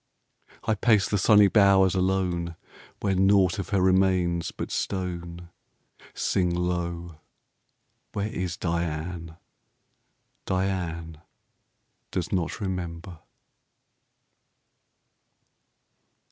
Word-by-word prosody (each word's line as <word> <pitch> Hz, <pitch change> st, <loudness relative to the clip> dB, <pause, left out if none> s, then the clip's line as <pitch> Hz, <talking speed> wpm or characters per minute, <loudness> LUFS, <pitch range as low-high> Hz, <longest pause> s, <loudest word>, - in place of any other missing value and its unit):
I 110 Hz, -, +1 dB
pace 105 Hz, -2 st, +3 dB
the 105 Hz, -, 0 dB
sunny 105 Hz, +1 st, +6 dB
bowers 100 Hz, -2 st, +5 dB
alone 90 Hz, -3 st, 0 dB, 0.5 s
Where 100 Hz, -2 st, +1 dB
nought 95 Hz, +1 st, +3 dB
of 95 Hz, -, -4 dB
her 100 Hz, -1 st, +1 dB
remains 95 Hz, -2 st, +2 dB
but -, -, -6 dB
stone. 85 Hz, -2 st, -4 dB, 0.7 s
Sing 90 Hz, -2 st, +1 dB
low 85 Hz, -2 st, -3 dB, 0.9 s
where 100 Hz, +1 st, -2 dB
is 90 Hz, -5 st, -3 dB
Diane? 85 Hz, 0 st, -3 dB, 1.1 s
Diane 85 Hz, -4 st, -2 dB, 0.9 s
does 90 Hz, -2 st, -3 dB
not 90 Hz, -4 st, -1 dB
remember. 90 Hz, -3 st, -5 dB
90 Hz, 80 wpm, -26 LUFS, 85-95 Hz, 1.1 s, sunny